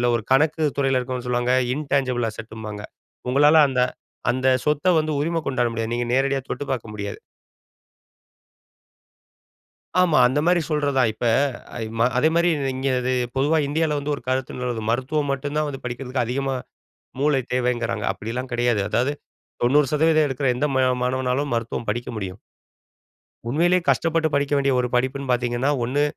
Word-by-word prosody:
ஒரு 115 - -2
கணக்கு 155 +3 +2 0.2
துறையில 135 -2 +2
இருக்கிறவங்க 125 0 -4
சொல்லுவாங்க. 125 +1 +1 0.2
இன்டாங்கிபிள் 135 -5 0
அசெட்ம்பாங்க 110 -1 -8 0.5
உங்களால 145 +4 +6
அந்த 130 - -1 0.5
அந்த 130 +1 -1 0.2
சொத்த 150 +4 +2
வந்து 155 0 -1
உரிம 165 +2 0
கொண்டாட 125 -3 +1
முடியாது. 115 0 -3
நீங்க 120 0 -1
நேரடியா 135 +1 +2
தொட்டு 145 - -3
பார்க்க 115 -4 -4
முடியாது. 100 -1 -5 2.8
ஆமா, 170 -5 +4
அந்த 130 +4 0
மாரி 175 0 +4
சொல்றது 145 -2 0
தான். 125 -4 +4
இப்ப 110 +3 -4 0.9
அதே 155 - +4
மாரி 170 +1 +4 0.3
இங்கே 135 +1 -1
இது 130 - 0 0.2
பொதுவா 150 +4 +2
இந்தியால 155 0 0
வந்து 145 +1 -2
ஒரு - - -11
கருத்து 125 -2 -2
மருத்துவம் 140 +4 -1
மட்டும் 145 +2 -4
தான் 155 - +1
வந்து 135 -2 -7
படிக்கிறதுக்கு 125 +1 -3
அதிகமா 135 +2 -1 0.6
மூளை 145 -1 +3
தேவைங்கிறாங்க. 120 -3 -1
அப்டிலாம் 120 +6 -5
கிடையாது. 120 -3 +1
அதாது 125 +6 +1 0.5
90% 150 +4 +3
எடுக்கிற 135 +1 -2
எந்த 150 +4 +1
ம - - +4 0.3
மாணவனாலும் 130 +2 -1
மருத்துவம் 115 -1 -3
படிக்க 120 +3 -3
முடியும். 95 -1 -5 1.1
உண்மையிலேயே 175 +7 +2
கஷ்டப்பட்டு 165 -1 +2
படிக்க 140 0 0
வேண்டிய 140 -1 +2
ஒரு 125 - -1
படிப்புன்னு 130 +2 0
பார்த்தீங்கன்னா, 120 +2 0
ஒண்ணு 140 +5 0
130 Hz, 140 wpm, -23 LUFS, 120-145 Hz, 2.8 s, உங்களால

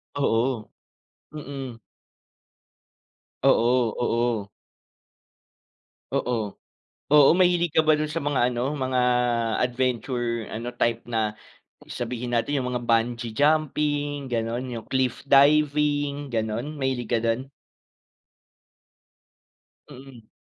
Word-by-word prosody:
Oo. 120 -4 0 0.6
Mm. 135 -5 -7 1.6
Oo, 120 -1 +3
oo. 115 -4 0 1.7
Oo, 125 -1 0 0.7
oo, 150 -2 +7
mahilig 175 -2 +3
ka - - +6
ba 155 0 +4
dun 155 - -1
sa 155 +1 -4
mga 140 -4 +2
ano, 125 +2 -1
mga 130 -1 0 0.7
adventure 120 -2 -2
ano, 120 +2 -5
type 120 -1 -1
na 110 -2 0 0.5
sabihin 120 0 -3
natin 140 +4 0
yung 125 - -3
mga 120 - -4
bungee 115 0 0
jumping, 145 0 0
gano'n, 120 +1 -2
yung 115 - -7
cliff 130 -2 -1
diving, 145 0 +3
gano'n, 115 +5 -3
mahilig 130 -4 -2
ka 120 - +2
dun? 115 +4 -1 2.4
Mm. 130 -5 -14
125 Hz, 95 wpm, -25 LUFS, 115-145 Hz, 2.4 s, oo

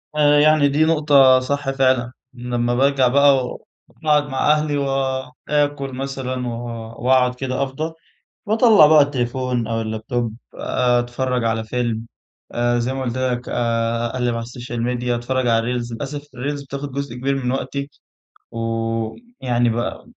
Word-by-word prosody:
آآ، 145 -1 +4
يعني 150 -1 +5
دي 150 +3 +2
نقطة 145 -5 +5
صح 140 +2 -2
فعلًا، 130 -3 +1 0.2
لمَّا 120 -1 -2
بارجع 135 0 +3
بقى 140 +2 +5
وأقعد 150 +4 -2
مع 135 +2 +2
أهلي 150 -1 +1
وآكُل 135 +1 -1
مثلًا، 130 -1 -4
و - - -2 0.5
وأقعد 125 -1 +3
كده، 130 +1 -2
أفضَى، 155 +5 -4 0.5
باطلَع 215 -6 +6
بقى 155 -1 +7
التليفون 125 -3 -1
أو 115 0 -1
الlaptop، 110 +2 -2 0.3
آآ، 125 -1 +1
أتفرَّج 125 0 -2
على 115 -1 0
فيلم، 115 -1 -2 0.5
آآ 120 0 +1
زي 120 +2 -1
ما 135 - -3
قُلت 130 0 -3
لك 125 -1 -2
آآ، 115 0 0
أقلِّب 125 0 -1
على 115 0 -3
الsocial 120 0 -7
media، 120 +1 -1
أتفرَّج 130 +1 -1
على 120 +1 +1
الreels. 120 0 -8
للأسف 145 +4 -5
الreels 140 +3 -4
بتاخُد 140 0 -6
جزء 140 -3 -4
كبير 135 +2 -1
من 130 -2 -2
وقتي، 140 +1 -3 0.6
ويعني 115 - -2
ب 120 +1 -3
130 Hz, 145 wpm, -20 LUFS, 120-140 Hz, 0.6 s, بقى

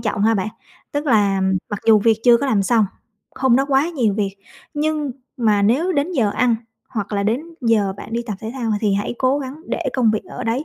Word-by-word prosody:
trọng 210 -3 -1
ha 225 +1 +4
bạn. 195 +1 -1 0.4
Tức 290 +1 -2
là, 205 -5 +3
ừm, 190 0 +1
mặc 205 - -3
dù 220 -1 +7
việc 220 +1 +3
chưa 240 -1 +7
có 280 - -2
làm 210 -6 +2
xong, 220 0 +3 0.5
hôm 260 -2 +3
đó 270 - +2
quá 275 +3 +3
nhiều 245 - 0
việc, 200 -2 -2 0.4
nhưng 300 -1 -1 0.3
mà 215 -4 +2
nếu 280 - +2
đến 310 +3 0
giờ 225 -9 +2
ăn 235 +1 +2 0.4
hoặc 210 -2 -4
là 200 -1 0
đến 220 +6 +1 0.2
giờ 220 -5 +2
bạn 225 - -9
đi 235 +1 -1
tập 210 - -3
thể 220 - -5
thao, 235 -4 -2
ờ, 210 - +1
thì 205 -3 +1
hãy 205 +4 -2
cố 260 +2 +2
gắng 265 -1 -5
để - - -3
công 240 -4 +3
việc 215 - -2
ở 250 - -7
đấy. 235 +6 -1
225 Hz, 240 wpm, -20 LUFS, 205-265 Hz, 0.5 s, dù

